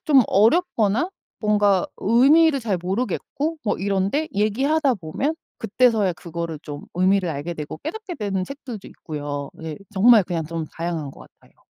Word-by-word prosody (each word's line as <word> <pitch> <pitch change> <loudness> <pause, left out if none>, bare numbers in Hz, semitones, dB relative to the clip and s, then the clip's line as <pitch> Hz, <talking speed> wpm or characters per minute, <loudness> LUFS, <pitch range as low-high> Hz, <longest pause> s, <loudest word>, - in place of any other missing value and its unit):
좀 280 -5 +6
어렵거나 230 - +2 0.3
뭔가 205 -3 +2
의미를 275 +7 +4
잘 210 -6 -1
모르겠고 255 - -2
뭐 210 - +1
이런데 200 +10 0
얘기하다 265 +8 +2
보면 200 - -2 0.2
그때서야 225 -4 +2
그거를 165 0 -5
좀 145 -2 -7
의미를 185 +1 +2
알게 160 +3 -4
되고 155 0 -6
깨닫게 370 +4 -6
되는 195 - -2
책들도 250 -4 -8
있고요. 145 -3 -6
예 160 -2 -5 0.2
정말 215 +2 +6
그냥 170 -3 -2
좀 165 +1 -4
다양한 165 -4 -3
것 - - -15 0.2
같아요. - - -25
200 Hz, 330 characters per minute, -23 LUFS, 170-260 Hz, 0.3 s, 좀